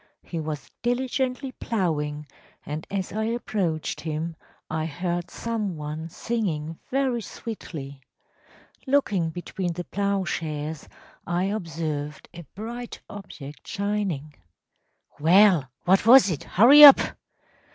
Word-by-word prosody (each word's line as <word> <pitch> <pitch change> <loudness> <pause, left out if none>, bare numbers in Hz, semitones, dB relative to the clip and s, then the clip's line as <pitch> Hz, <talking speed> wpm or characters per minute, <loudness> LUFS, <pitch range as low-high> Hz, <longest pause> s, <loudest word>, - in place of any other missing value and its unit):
He 170 - -5
was 155 -3 -5
diligently 255 +2 -1
ploughing, 150 -11 -2 0.4
and 150 +2 -5
as 195 -2 -3
I 220 +1 -1
approached 200 -8 -2
him 160 +1 -3 0.3
I 155 0 -2
heard 175 +2 -3
some 215 -7 -3
one 150 +2 -5
singing 165 -7 -3
very 260 -3 0
sweetly. 145 -12 -8 0.9
Looking 210 -12 +2
between 175 +1 -4
the 175 +1 -5
ploughshares, 170 -7 -3 0.4
I 175 +1 0
observed 160 -7 -4
a 170 -1 -10
bright 235 +4 -6
object 155 -8 -10
shining.‚ÄĚ 165 - -6
“Well, 175 -4 +5 0.2
what 190 +2 +4
was 245 -5 +8
it? 155 - -4
Hurry 270 +9 +8
up! 280 -2 +12
175 Hz, 110 wpm, -25 LUFS, 155-220 Hz, 0.9 s, up